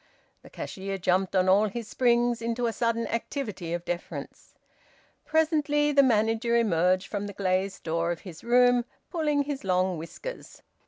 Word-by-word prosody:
The -, -, -15 dB
cashier 195 Hz, 0 st, -5 dB
jumped 185 Hz, +1 st, +1 dB
on 185 Hz, 0 st, +3 dB
all 200 Hz, +3 st, +5 dB
his 225 Hz, +2 st, -6 dB
springs 240 Hz, 0 st, +2 dB
into 235 Hz, +1 st, -1 dB
a 230 Hz, -, 0 dB
sudden 230 Hz, 0 st, 0 dB
activity 225 Hz, -, -4 dB
of 175 Hz, 0 st, -3 dB
deference. 175 Hz, 0 st, -6 dB, 0.7 s
Presently 300 Hz, -2 st, +2 dB
the 280 Hz, -1 st, +6 dB
manager 225 Hz, -1 st, +2 dB
emerged 185 Hz, -4 st, +2 dB
from 205 Hz, -1 st, -4 dB
the 200 Hz, -, -7 dB
glazed 190 Hz, 0 st, -1 dB
door 165 Hz, +1 st, -1 dB
of 170 Hz, -, -5 dB
his 170 Hz, -5 st, -11 dB
room, 245 Hz, 0 st, +4 dB, 0.3 s
pulling 300 Hz, -4 st, +1 dB
his 280 Hz, -1 st, -5 dB
long 185 Hz, -2 st, +1 dB
whiskers. 170 Hz, -, -9 dB
225 Hz, 155 wpm, -27 LUFS, 185-245 Hz, 0.7 s, the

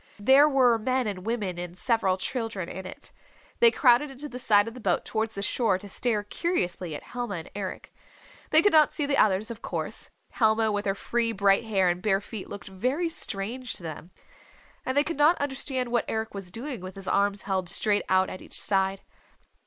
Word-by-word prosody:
There 265 Hz, +8 st, +6 dB
were 250 Hz, -5 st, +4 dB
men 255 Hz, +2 st, 0 dB
and 200 Hz, -1 st, -5 dB
women 205 Hz, -7 st, -2 dB
and 175 Hz, 0 st, -7 dB
several 220 Hz, -4 st, +1 dB
children 220 Hz, -4 st, -2 dB
in 190 Hz, +1 st, -7 dB
it. -, -, -10 dB, 0.5 s
They 470 Hz, -, +8 dB
crowded 270 Hz, -, +4 dB
into 270 Hz, +2 st, -8 dB
the 250 Hz, -3 st, -8 dB
side 205 Hz, -3 st, +4 dB
of 230 Hz, -, -6 dB
the 255 Hz, -, -10 dB
boat 190 Hz, -6 st, 0 dB
towards 220 Hz, 0 st, -2 dB
the 200 Hz, -, -4 dB
shore 220 Hz, -4 st, +1 dB
to 205 Hz, -, -10 dB
stare 210 Hz, +1 st, -1 dB
curiously 185 Hz, -, -2 dB
at -, -, -8 dB
Helma 240 Hz, -5 st, -5 dB
and 165 Hz, -2 st, -8 dB
Eric. 195 Hz, -2 st, -6 dB, 0.6 s
They 315 Hz, +1 st, +5 dB
could 410 Hz, -, +4 dB
not 310 Hz, -1 st, +6 dB
see 295 Hz, -, -2 dB
the 280 Hz, 0 st, +1 dB
others, 210 Hz, +2 st, +2 dB
of 230 Hz, -1 st, -9 dB
course. -, -, -4 dB, 0.2 s
Helma 220 Hz, -1 st, +2 dB
with 205 Hz, 0 st, -2 dB
her 195 Hz, -, +1 dB
free, 230 Hz, +2 st, -1 dB
bright 200 Hz, +1 st, +3 dB
hair 195 Hz, -4 st, +2 dB
and 175 Hz, 0 st, 0 dB
bare 195 Hz, -1 st, +2 dB
feet 205 Hz, 0 st, -8 dB
looked 200 Hz, -3 st, -8 dB
very 255 Hz, -, -1 dB
strange 240 Hz, -2 st, -1 dB
to -, -, -6 dB
them. 160 Hz, +1 st, -7 dB, 0.8 s
And 260 Hz, +2 st, -1 dB
they 290 Hz, -, +5 dB
could 320 Hz, -1 st, -4 dB
not 300 Hz, +4 st, +5 dB
understand 265 Hz, -3 st, -2 dB
what 240 Hz, -1 st, +1 dB
Eric 220 Hz, 0 st, -3 dB
was 195 Hz, -3 st, -4 dB
doing 240 Hz, +3 st, -6 dB
with 185 Hz, 0 st, -8 dB
his 195 Hz, -1 st, -9 dB
arms 200 Hz, 0 st, +1 dB
held 190 Hz, -3 st, -1 dB
straight 205 Hz, +2 st, +2 dB
out 185 Hz, 0 st, +3 dB
at 185 Hz, -, -8 dB
each -, -, -8 dB
side. 195 Hz, -1 st, 0 dB
215 Hz, 210 wpm, -27 LUFS, 195-255 Hz, 0.8 s, They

